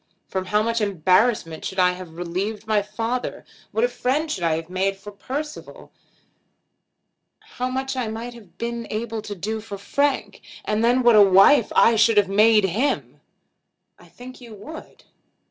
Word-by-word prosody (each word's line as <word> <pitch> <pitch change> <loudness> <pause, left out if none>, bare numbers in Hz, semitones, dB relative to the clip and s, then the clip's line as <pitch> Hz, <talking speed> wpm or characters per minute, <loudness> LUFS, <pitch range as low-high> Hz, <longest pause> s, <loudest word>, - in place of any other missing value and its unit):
From 190 -1 -3
how 210 +3 +1
much 230 0 -1
embarrassment 185 -2 +1
should 190 - -5
I 180 -1 +4
have 180 -3 -10
relieved 195 +5 -4
my 215 -1 +2
father! 230 +4 -4 0.3
What 455 - 0
a - - +4
friend 280 - -1
I - - -7
should 190 - -4
have 165 0 0
made 190 +2 -1
for 205 +1 -11
Percival! 285 +9 -7 1.5
How 250 0 -5
much 265 +1 -3
I 250 -3 -2
might 230 +3 -6
have 215 -7 -16
been 235 0 -4
able 225 0 -4
to 205 -1 -7
do 215 +4 -4
for 205 -2 -8
Frank! 280 +7 -1 0.2
And 215 +1 0
then 245 +2 +3
what 240 -2 +6
a 210 - +8
wife 200 +6 +6
I 230 -1 +5
should 225 0 +4
have 200 -2 +4
made 215 +1 +5
him!" 215 +10 -1 0.8
"I - - -18
think 255 +1 -13
you 230 -3 -11
would." 310 +11 -11
215 Hz, 170 wpm, -22 LUFS, 195-245 Hz, 1.5 s, a